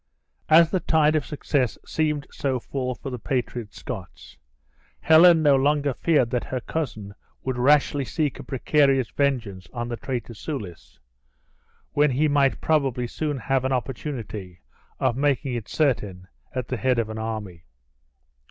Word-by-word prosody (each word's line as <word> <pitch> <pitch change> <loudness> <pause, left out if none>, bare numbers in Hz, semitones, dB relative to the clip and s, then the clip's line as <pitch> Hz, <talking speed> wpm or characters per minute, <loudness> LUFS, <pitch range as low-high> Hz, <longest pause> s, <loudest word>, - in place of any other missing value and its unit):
As 160 +1 +6
the 185 - +1
tide 155 -2 +3
of 150 - 0
success 140 -4 -1
seemed 150 -2 -1
so 130 -2 -1
full 125 0 -3
for 135 - -7
the 125 - -5
patriot 120 -4 -3
Scots, - - -8 0.7
Helen 160 +1 +7
no 145 -2 +6
longer 145 +1 +2
feared 135 -5 +2
that 125 - -1
her 130 - -3
cousin 110 -8 -4 0.3
would 130 -1 -2
rashly 145 +1 +3
seek 150 +1 -2
a - - -7
precarious 135 -1 +2
vengeance 115 -10 -1
on 120 -1 -4
the 120 - -3
traitor 125 -4 -4
Soulis, 105 - -7 1.0
when 150 +1 +4
he 140 +4 +2
might 140 -2 +2
probably 135 -6 +1
soon 145 +4 -3
have 130 +1 0
an 130 - -1
opportunity 115 - -4 0.4
of - - +1
making 140 -1 0
it 115 -3 -5
certain 105 - -1 0.3
at 125 -2 -3
the 130 - -2
head 125 +3 +1
of 115 -2 0
an 110 - -5
army. 105 -6 -5
130 Hz, 150 wpm, -24 LUFS, 115-145 Hz, 1.0 s, Helen